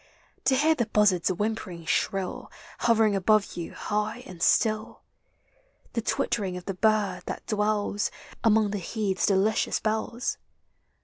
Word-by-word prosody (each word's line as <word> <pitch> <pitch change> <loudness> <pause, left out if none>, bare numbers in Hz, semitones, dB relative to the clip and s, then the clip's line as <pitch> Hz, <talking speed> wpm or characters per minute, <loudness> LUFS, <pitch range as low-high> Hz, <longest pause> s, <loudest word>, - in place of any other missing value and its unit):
To 265 - +4
hear 305 +4 +4
the 235 -8 -1
buzzard's 200 -5 +3
whimpering 185 -3 -3
shrill, 190 +3 -1 0.3
Hovering 220 -3 +3
above 205 +2 +2
you 170 -1 -6
high 210 +3 -2
and 180 -2 -11
si 225 - +5
ill? 215 0 -5 0.9
The 230 - 0
twittering 205 -5 -1
of 180 - -9
the 195 - -3
bird 205 -2 +1
thai - - -3
dwells 210 -1 0 0.3
Among 220 -2 +4
the 205 - -2
heath's 195 +1 -1
delicious 205 +2 +2
bells? 220 +2 -2
210 Hz, 135 wpm, -27 LUFS, 190-220 Hz, 0.9 s, si